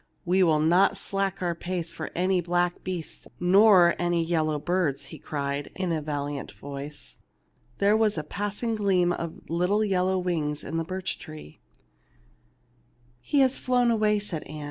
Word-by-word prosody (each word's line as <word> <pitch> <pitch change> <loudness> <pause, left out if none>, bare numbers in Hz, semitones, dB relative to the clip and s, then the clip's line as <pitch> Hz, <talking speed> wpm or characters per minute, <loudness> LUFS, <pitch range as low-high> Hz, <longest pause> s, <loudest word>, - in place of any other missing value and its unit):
"We 185 +2 +3
will 160 -4 +4
not 175 +5 +4
slack 195 -1 -2
our 175 -1 0
pace 170 0 -4
for 155 - -6
any 185 +1 +2
black 175 +1 0
beasts 180 -3 -5
nor 185 -1 +6
any 175 -1 +1
yellow 160 -2 0
birds/'' 170 -3 -1
he - - -10
cried, 140 -1 -3
in 185 -2 -2
a 160 -2 0
valiant 145 -1 -4
voice. 140 +1 -6 0.6
There 200 +2 +3
was 220 -3 +2
a 155 - -2
passing 205 +7 -3
gleam 190 -5 +2
of 170 -2 -6
little 180 +6 +1
yellow 190 -1 +1
wings 160 -5 -2
above 165 - -4
the 165 - -1
birch 185 +2 -4
tree. 155 - -11 1.6
"He 280 - +1
has 265 0 +2
flown 245 -2 +2
away,'' 215 -2 +2
said 200 -6 -4
Ann. 155 +1 -8
175 Hz, 160 wpm, -26 LUFS, 155-195 Hz, 1.6 s, nor